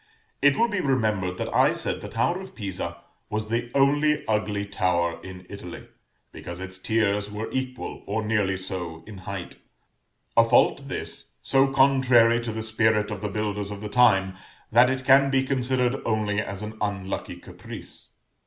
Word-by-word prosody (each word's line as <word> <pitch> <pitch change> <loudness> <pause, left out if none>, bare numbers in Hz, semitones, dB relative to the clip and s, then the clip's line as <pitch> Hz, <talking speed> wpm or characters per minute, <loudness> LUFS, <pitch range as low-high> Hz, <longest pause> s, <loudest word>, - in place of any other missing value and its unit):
It 140 0 +5
will 235 - +4
be 205 -4 -2
remembered 105 - 0
that - - -4
I - - +4
said - - -3
the - - -7
tower 130 - 0
of 190 - -11
Pisa 90 -5 -5 0.3
was 110 0 -3
the 120 +1 -1
only 145 +2 +3
ugly 105 -2 0
tower 90 -4 0
in 90 -1 -10
Italy, 90 -4 -9 0.4
because 85 0 -8
its 95 0 -7
tiers 105 -1 0
were 105 +2 -5
equal, 130 -1 -4
or 110 +2 -2
nearly 105 -3 +1
so, 90 -4 -5
in 100 -3 -10
height; 95 -3 -6 0.8
a 115 - +7
fault 125 +4 +3
this, 130 - -5
so 135 0 +4
contrary 130 -4 +4
to 115 -1 -4
the 110 0 -4
spirit 110 -1 +1
of 105 - -5
the 105 - -2
builders 105 -1 -2
of 100 -1 -7
the 105 - -5
time, 100 -6 +4 0.4
that 120 +3 +6
it 130 0 -2
can 135 +1 +6
be 135 -1 +2
considered 130 -1 0
only 105 -2 0
as 100 -1 -6
an 110 +1 -7
unlucky 100 -2 -3
caprice. - - -11
110 Hz, 170 wpm, -25 LUFS, 100-130 Hz, 0.8 s, a